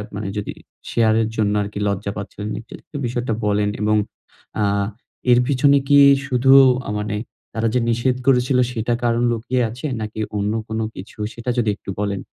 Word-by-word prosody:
মানে 100 -1 -4
যদি 105 - -3 0.4
শেয়ারের 110 -1 +2
জন্য 105 -2 +1
আর 100 - -2
কি - - -4
লজ্জা 100 0 -2
পাচ্ছিলেন 100 +1 -6
একটু - - -15 0.2
এই 145 - -2
বিষয়টা 120 -1 -2
বলেন 105 0 +1
এবং 105 0 +2 0.6
আ - - +3 0.7
এর 120 - +6
পিছনে 140 +1 +4
কি 145 0 +6 0.3
শুধু 130 +1 +3 0.5
মানে 105 0 -3 0.4
তারা 115 +1 0
যে 125 - +3
নিষেধ 120 +2 +1
করেছিল 130 0 +3
সেটা 120 0 -1
কারণ 120 0 +1
লুকিয়ে 120 +2 -1
আছে 120 +6 -8 0.2
নাকি 110 0 -5 0.2
অন্য 105 +1 0
কোনো 110 0 -2
কিছু 95 +4 -10 0.2
সেটা 120 +1 -6
যদি 115 -3 +2
একটু 100 - -12
বলেন? 100 -1 -1
110 Hz, 170 wpm, -21 LUFS, 105-125 Hz, 0.7 s, এর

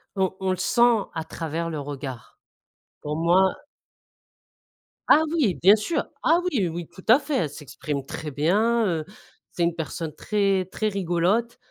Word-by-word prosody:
On 190 -1 0
on 190 0 -1
le 185 - -1
sent 240 -3 +3
à 160 -1 -3
travers 165 +1 -4
le 155 -2 -4
regard. 135 -4 -7 0.6
Pour 150 0 -3
moi 180 +3 +3 1.5
Ah 315 - +6
oui, 245 - +2
bien 195 +4 +6
sûr. 215 +10 -2 0.2
Ah 335 +2 +4
oui, 205 -10 +1
oui, 170 0 -6
tout 185 - -15
à 235 +6 +7
fait. 290 -1 -3
Elle 155 -4 0
s'exprime 145 -1 -6
très 155 +1 -6
bien, 210 - +2
heu, 160 -4 -1 0.5
c'est 175 - -1
une 170 0 +1
personne 160 0 -5
très, 195 -3 +1
très 215 +3 -3
rigolote 195 +5 0
180 Hz, 160 wpm, -24 LUFS, 160-215 Hz, 1.5 s, à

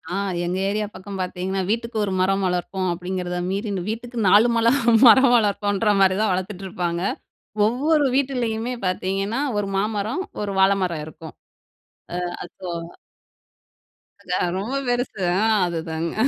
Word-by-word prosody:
ஆ - - -1 0.3
எங்க 180 +2 -2
ஏரியா 210 +1 -1
பக்கம் 195 +1 -7
பார்த்தீங்கன்னா, 185 +1 -2
வீட்டுக்கு 230 +1 -2
1 195 - -3
மரம் 195 +1 +2
வளர்ப்போம் 180 +1 -2
அப்படீங்கிறதை 180 0 -4
மீறி, 200 +3 -2 0.2
வீட்டுக்கு 235 +2 -5
4 210 +5 +6
மல 230 0 +2 0.4
மரம் 245 +2 +7
வளர்ப்போன்ற 205 -1 +1
மாரி 190 -1 +4
தான் 220 - +2
வளர்த்துட்டுருப்பாங்க. 180 -2 -3 0.7
ஒவ்வொரு 290 +6 +2
வீட்டுலயுமே 250 -3 -1
பார்த்தீங்கன்னா, 195 +5 -1 0.2
ஒரு 205 -1 -1
மாமரம், 215 - -1 0.2
ஒரு 205 -1 -2
வாழைமரம் 190 -5 +2
இருக்கும். 160 0 -11 0.9
அ - - -3 0.2
அசோகா 170 -2 -7 1.3
அது - - -1
ரொம்ப 230 +8 -3
பெருசு 245 -4 -1 0.2
ஆ, - - +1 0.2
அதுதாங்க. 165 -1 -3
195 Hz, 125 wpm, -22 LUFS, 180-225 Hz, 1.3 s, மரம்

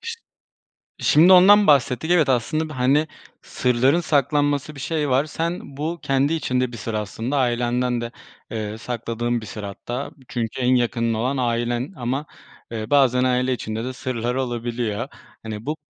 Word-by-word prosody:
Şi 465 0 -5 0.9
şimdi 170 +5 +6
ondan 200 +3 +7
bahsettik. 140 +2 +3
Evet, 160 -6 +4
aslında 155 +6 0
bi 155 - -7
hani, 135 +4 +2 0.3
sırların 130 +6 +2
saklanması 145 -1 +1
bir - - -9
şey 150 0 -1
var. 130 +3 +3
Sen 165 +3 -3 0.2
bu 160 +3 -3
kendi 135 +3 +1
içinde 130 -6 0
bir 120 - -8
sır 115 +1 -5
aslında 110 +6 -3
ailenden 120 -1 0
de, 120 0 -5 0.4
eee, 110 -1 -4
sakladığın 120 0 -3
bir - - -8
sır 105 0 -7
hatta. 120 +7 -5 0.2
Çünkü 120 +1 -3
en 125 +1 +3
yakının 115 -1 +1
olan 125 +5 -1
ailen 120 +4 -1
ama, 130 +2 -2 0.5
eee, 110 -1 -5
bazen 130 -3 +4
aile 125 0 +1
içinde 110 -2 -4
de 130 +1 -4
sırlar 125 -1 -3
olabiliyor. 120 -2 -2 0.4
Hani, 110 0 -6
bu 150 +2 -2
125 Hz, 160 wpm, -22 LUFS, 120-145 Hz, 0.9 s, ondan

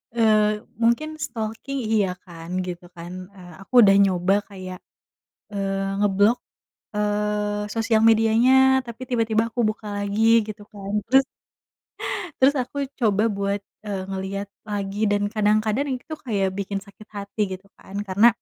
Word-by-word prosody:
Eee, 215 -2 +3 0.2
mungkin 235 +7 +2 0.2
stalking 225 +4 -4
iya 210 -3 +3 0.2
kan 165 -2 -11 0.2
gitu 175 0 -6
kan, 170 +1 -8 0.2
eee, 175 -3 -12
aku - - -31
udah 195 -2 +7
nyoba 185 0 +2 0.2
kayak, 185 -2 -8 0.8
eee, 195 -1 -1 0.2
ngeblok, 205 +3 +4 0.6
eee, 210 0 0
sosial 225 0 +2
medianya 225 +3 +5 0.3
tapi 235 +2 -9
tiba-tiba 225 -2 +2
aku 240 - -3
buka 215 0 -9
lagi 205 +1 -1 0.2
gitu 210 -1 -8
kan 200 -1 -7 0.2
terus 270 0 +6 1.2
terus 270 +2 +5
aku 255 +3 -7 0.2
coba 215 -3 +2
buat 200 0 0 0.3
e - - -4 0.2
ngeliat 195 +1 -4 0.2
lagi 200 -1 -3
dan 205 0 +2
kadang-kadang 215 +4 +2
itu 315 - -9
kayak 200 -5 +1
bikin 200 0 -2
sakit 210 +1 -16
hati 200 +2 -4
gitu 190 +1 -7
kan 195 - -13
karena, 200 +5 +5
210 Hz, 135 wpm, -24 LUFS, 195-225 Hz, 1.2 s, udah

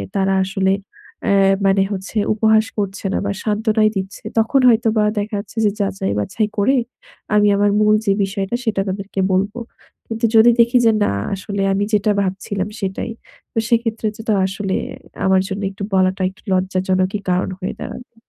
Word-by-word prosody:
তারা 195 0 +2
আসলে 190 -1 +1 0.6
এ - - +4 0.3
মানে 195 0 +4
হচ্ছে 195 +2 -5 0.2
উপহাস 220 0 +3
করছে 200 -1 -3
না - - +1
বা 200 - 0
সান্ত্বনাই 215 0 +2
দিচ্ছে, 190 +1 -5 0.2
তখন 225 +5 +2
হয়তোবা 225 -2 +3 0.2
দেখা 205 +1 -3
যাচ্ছে 210 - -10
যে 205 - +3
যাচাই-বাছাই 180 - -1
করে 260 +7 +3 0.6
আমি 210 0 +5
আমার 205 0 +3
মূল 215 0 +5
যে 200 - +3
বিষয়টা 195 +2 -2
সেটা 210 -4 +1
তাদেরকে 195 +1 -4
বলব। 195 +2 +1 0.5
কিন্তু 225 +1 -1
যদি 225 +2 +7
দেখি 235 +2 +5
যে 225 - +6
না - - +1 0.2
আসলে 200 +1 -4
আমি 200 +1 0
যেটা 210 0 +3
ভাবছিলাম 195 +1 -3
সেটাই, 195 +3 -3 0.4
তো - - -8
সেক্ষেত্রে 230 -2 0
যেটা 220 0 -1
আসলে 195 0 -3 0.5
আমার 190 0 +4
জন্য 195 +1 -4
একটু 195 +1 -8
বলাটা 190 0 +2
একটু 190 - -19
লজ্জাজনকই 185 +1 0
কারণ 180 +1 +1
হয়ে 185 +1 -3
দাঁড়াবে। 245 -1 -8
200 Hz, 160 wpm, -19 LUFS, 190-220 Hz, 0.6 s, যদি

